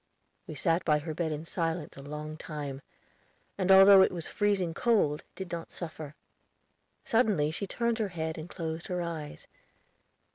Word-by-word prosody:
We 155 Hz, -, -7 dB
sat 165 Hz, +5 st, +1 dB
by 150 Hz, -, +3 dB
her 155 Hz, +1 st, -5 dB
bed 160 Hz, 0 st, -2 dB
in 155 Hz, +1 st, -4 dB
silence 165 Hz, -2 st, -3 dB
a 140 Hz, -, -10 dB
long 150 Hz, +2 st, -6 dB
time, 145 Hz, -4 st, -6 dB, 0.7 s
and 190 Hz, -1 st, +1 dB
although 195 Hz, 0 st, +9 dB
it 190 Hz, -, +4 dB
was 170 Hz, -2 st, -5 dB
freezing 200 Hz, -5 st, 0 dB
cold, 185 Hz, -10 st, +2 dB
did 190 Hz, -3 st, -7 dB
not 170 Hz, -1 st, -5 dB
suffer. 155 Hz, -3 st, -7 dB, 0.9 s
Suddenly 210 Hz, -10 st, +2 dB
she 200 Hz, +5 st, -4 dB
turned 235 Hz, +2 st, -1 dB
her 215 Hz, -, +1 dB
head 160 Hz, -3 st, -4 dB
and 160 Hz, +2 st, -8 dB
closed 165 Hz, -2 st, -5 dB
her 180 Hz, -1 st, -2 dB
eyes. 160 Hz, -3 st, -6 dB
165 Hz, 160 wpm, -30 LUFS, 155-190 Hz, 0.9 s, although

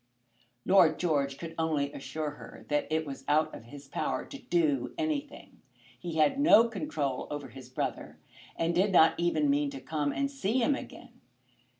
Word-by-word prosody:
Lord 175 Hz, -5 st, +5 dB
George 140 Hz, -5 st, 0 dB
could 165 Hz, -1 st, -7 dB
only 150 Hz, -3 st, 0 dB
assure 145 Hz, +3 st, -4 dB
her 145 Hz, -, -12 dB
that 150 Hz, 0 st, 0 dB
it 160 Hz, 0 st, 0 dB
was 135 Hz, -2 st, -7 dB
out 155 Hz, +1 st, +2 dB
of 115 Hz, -, -10 dB
his 140 Hz, +3 st, -12 dB
power -, -, -2 dB
to 275 Hz, -, -10 dB
do 155 Hz, -7 st, 0 dB
anything. 305 Hz, -3 st, -4 dB, 0.4 s
He 170 Hz, +4 st, -5 dB
had 155 Hz, -, +3 dB
no 260 Hz, -6 st, +7 dB
control 145 Hz, -, -3 dB
over 145 Hz, -1 st, -5 dB
his 130 Hz, -2 st, -12 dB
brother, 130 Hz, -, -4 dB, 0.4 s
and 165 Hz, +1 st, 0 dB
did 190 Hz, +4 st, +2 dB
not 165 Hz, -3 st, +6 dB
even 160 Hz, -3 st, +1 dB
mean 145 Hz, +1 st, +2 dB
to 135 Hz, -1 st, -7 dB
come 145 Hz, +1 st, -2 dB
and 275 Hz, -, -1 dB
see 250 Hz, -4 st, -1 dB
him 260 Hz, +3 st, +3 dB
again. 275 Hz, -, -9 dB
155 Hz, 175 wpm, -29 LUFS, 145-190 Hz, 0.4 s, no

